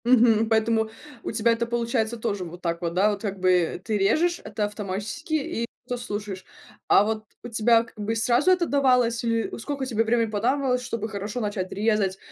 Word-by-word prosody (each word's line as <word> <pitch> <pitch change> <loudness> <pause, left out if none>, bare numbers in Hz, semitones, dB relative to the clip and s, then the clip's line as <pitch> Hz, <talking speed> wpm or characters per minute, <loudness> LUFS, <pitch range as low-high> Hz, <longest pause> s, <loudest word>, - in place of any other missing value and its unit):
Мгм. 225 -3 +5
Поэтому 220 0 +2 0.3
у - - -3
тебя 230 +1 +2
это 230 +1 0
получается 235 -1 -1
тоже 210 -4 -2
вот 175 +1 -9
так 170 0 -2
вот, 170 -1 -2
да? 200 +4 +3
Вот 200 -1 -4
как 200 -3 -4
бы 180 -2 +2
ты 220 -2 0
режешь 330 - +2
это 210 - -2
автоматически 210 - -5
и 275 -6 -1 0.2
то 245 - -2
слушаешь, 205 -5 -5 0.4
а 195 - +6
вот 215 0 -2 0.2
у - - -6
тебя 230 0 +4
как 235 -1 -18
бы 215 +2 -1
сразу 240 +8 +2
это 365 -2 +3
давалось 250 -5 +2
или 230 -1 0
сколько 275 +3 -4
тебе 225 -3 +1
времени 230 0 +1
понадобилось, 250 +4 +1
чтобы 230 -3 -4
хорошо 205 +3 -4
начать 205 -3 -3
резать 205 -2 +1
225 Hz, 190 wpm, -25 LUFS, 205-240 Hz, 0.4 s, а